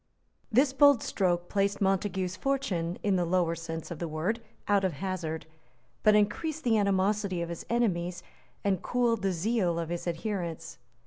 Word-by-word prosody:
This 265 +4 +4
bold 280 -3 +6
stroke 175 -3 0
placed 200 +1 0
Montague's 190 -1 0
fortune, 185 -12 -1
in 200 -2 +2
the 180 - +2
lower 175 -1 +1
sense 165 0 -6
of 170 - -5
the 170 - -2
word, 170 +9 -2 0.3
out 200 -1 +3
of 185 -3 +1
hazard, 165 -1 -4 0.6
but 215 0 +5
increased 295 +10 0
the 230 -2 +3
animosity 200 -2 +1
of 170 - -5
his 170 - -7
enemies 180 -7 0 0.4
and 195 -3 +1
cooled 240 -3 +1
the 195 0 +1
zeal 180 -1 0
of 165 -1 -3
his 175 +1 -4
adherents. 175 -1 -4
190 Hz, 165 wpm, -29 LUFS, 170-215 Hz, 0.6 s, bold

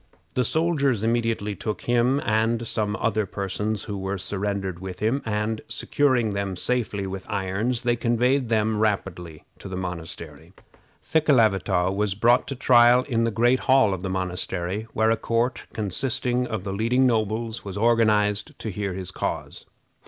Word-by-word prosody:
The 125 - +1
soldiers 140 -6 +1
immediately 115 -3 0
took 105 +3 -4
him 120 +3 +2
and 115 +1 +1
some 105 -2 -1
other 110 -2 0
persons 100 +2 -3
who 105 - -5
were 95 +1 -3
surrendered 95 -1 -2
with 95 -1 -7
him, 115 +7 0
and, 105 +1 -1
securing 130 -6 +1
them 100 -1 -2
safely 105 -1 -2
with 95 +1 -7
irons, 105 +5 -1
they 120 0 +2
conveyed 120 +2 +1
them 110 -1 +1
rapidly 90 -7 -2 0.2
to 100 - -8
the 95 - -5
monastery. 85 -2 -7 0.5
Thekelavitaw 105 - +2
was 100 -1 0
brought 120 +7 +3
to 140 - -4
trial 120 -1 +5
in 115 -4 0
the - - +1
great 120 +3 +2
hall 130 -7 +5
of 95 - -4
the 95 - -3
monastery, 95 +2 -2
where 110 0 +2
a 115 - +2
court, 115 +3 -1
consisting 125 +4 -1
of 110 -5 -4
the 100 -1 -4
leading 120 +6 +2
nobles, 110 -1 -1
was 100 -1 -6
organized 105 -2 +2
to 110 - -5
hear 100 0 -3
his 95 -1 -4
cause. - - -4
110 Hz, 160 wpm, -24 LUFS, 95-120 Hz, 0.5 s, trial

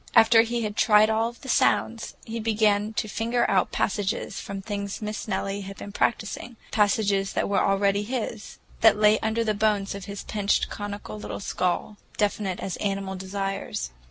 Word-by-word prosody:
After 225 0 +7
he 235 +1 -1
had 210 -1 -3
tried 215 0 +5
over 220 - +1
all 230 +1 +1
the 265 - -13
sounds, 230 -2 +1
he 230 +1 -4
began 215 -1 +2
to 215 - -1
finger 235 +3 0
out 190 -2 +2
passages 200 0 -1
from 200 -1 -6
things 200 0 -4
Miss 210 0 -5
Nellie 195 0 -2
had 195 0 -8
been 205 - -8
practicing, 230 +3 -1 0.2
passages 200 -2 +2
that - - 0
were 200 - +2
already 200 0 +2
his, 220 -1 -4 0.2
that 225 -1 +6
lay 210 0 +5
under 220 +1 0
the 215 -1 +1
bones 205 -1 +1
of 200 -2 -7
his 200 0 -6
pinched, 205 -1 0
conical 205 0 -6
little - - -6
skull, 190 +2 -1 0.2
definite 205 -3 0
as 190 - -4
animal 195 -1 -2
desires. 195 - -4
205 Hz, 175 wpm, -26 LUFS, 195-220 Hz, 0.2 s, After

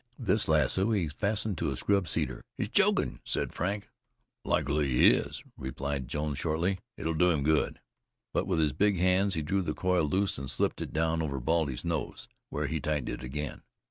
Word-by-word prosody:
This 110 -2 +1
lasso 80 - +2
he 95 -6 +1
fastened 100 +2 -1
to - - 0
a - - -3
scrub 100 -3 +1
cedar. 65 -4 -1 0.2
"He's - - -2
chokin'!" - - +2
said - - -2
Frank. 100 +4 -2 0.6
"Likely 75 +1 +1
he 60 - +6
is," - - -2
replied 65 0 -4
Jones 75 -1 -2
shortly. 85 +5 0 0.2
"It'll 80 - -1
do 90 +3 +4
him 75 -5 +1
good." 80 +1 +1 0.5
But - - 0
with 90 -3 +1
his 75 -4 +2
big 100 +3 +2
hands 95 +2 +3
he 80 - -1
drew 95 +6 +1
the 75 -4 -2
coil 90 -3 +2
loose 95 +4 0
and 70 -1 -5
slipped - - 0
it - - -4
down 80 +1 +1
over 70 -4 -2
Baldy's 75 0 0
nose, 80 -6 -3 0.2
where - - -2
he 80 - -1
tightened 75 -1 -1
it - - -4
again. 70 +2 -5
80 Hz, 190 wpm, -30 LUFS, 75-95 Hz, 0.6 s, he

